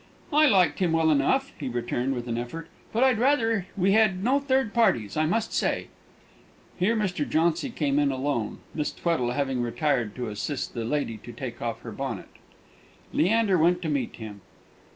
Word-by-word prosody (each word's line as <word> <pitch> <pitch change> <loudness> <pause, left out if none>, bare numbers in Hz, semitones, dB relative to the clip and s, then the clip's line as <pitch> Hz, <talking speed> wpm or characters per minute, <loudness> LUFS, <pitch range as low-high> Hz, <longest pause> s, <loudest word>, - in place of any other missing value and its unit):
"I 305 +1 +6
like 190 -8 +3
him 175 -4 +1
well 160 -1 +3
enough," 265 - +2
he 140 -4 -3
returned, 120 +2 -1
with 120 0 -5
an 115 - -2
effort; 120 +8 -5 0.2
"but 230 +3 +2
I'd 255 -4 +3
rather 225 -7 +2
we 195 +1 +3
had 195 -3 +3
no 265 +5 +3
third 265 -5 0
parties, 120 - +2
I 155 0 +2
must 220 +6 -1
say." - - 0 0.9
Here 205 +6 +2
Mr. 190 -8 -1
Jauncy 165 - +1
came 145 - 0
in 145 -1 +2
alone, 130 -4 -2
Miss 150 -1 -2
Tweddle 125 -8 -1
having 135 -3 0
retired 120 -3 0
to 125 -3 -4
assist 120 +6 -4
the 115 -2 -3
lady 120 -3 -1
to - - -11
take - - -7
off - - -3
her - - -7
bonnet. - - -5 0.8
Leander 200 -1 +3
went 175 +2 +3
to 160 - -1
meet 140 -5 -1
him. 105 -3 -9
160 Hz, 180 wpm, -26 LUFS, 125-215 Hz, 0.9 s, I